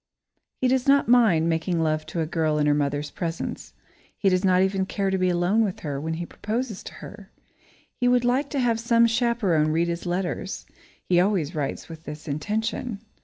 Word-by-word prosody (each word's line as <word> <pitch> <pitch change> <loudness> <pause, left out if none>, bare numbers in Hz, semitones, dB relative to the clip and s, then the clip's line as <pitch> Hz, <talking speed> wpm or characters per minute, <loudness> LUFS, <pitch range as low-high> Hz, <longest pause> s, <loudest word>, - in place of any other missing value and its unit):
He 255 - +3
does 260 +1 +1
not 280 0 +4
mind 220 -10 +4
making 165 +1 0
love 155 -1 0
to 170 - -3
a - - 0
girl 155 -1 0
in 150 - +2
her 150 - +4
mother's 145 0 -1
presence. 170 -2 -5 0.4
He 195 - +2
does 185 0 +1
not 185 -1 +4
even 190 0 0
care 195 -1 -1
to 190 - +1
be 185 0 +2
alone 180 +6 +2
with 195 -4 -3
her 140 -3 -4
when 160 +1 -3
he 170 +1 -4
proposes 220 +3 -4
to - - -8
her. 205 -1 -12 0.7
He 245 - +2
would 245 0 +3
like 265 +4 +1
to 280 - -2
have 235 -3 +1
some 235 0 +4
chaperone 225 -10 +1
read 170 +2 +1
his 170 +1 -4
letters 180 +2 -3 0.4
he 175 -1 +2
always 180 -4 +1
writes 145 -4 -3
with 160 -1 -11
this 150 +1 -8
intention. 215 - -2
185 Hz, 200 wpm, -25 LUFS, 160-225 Hz, 0.7 s, not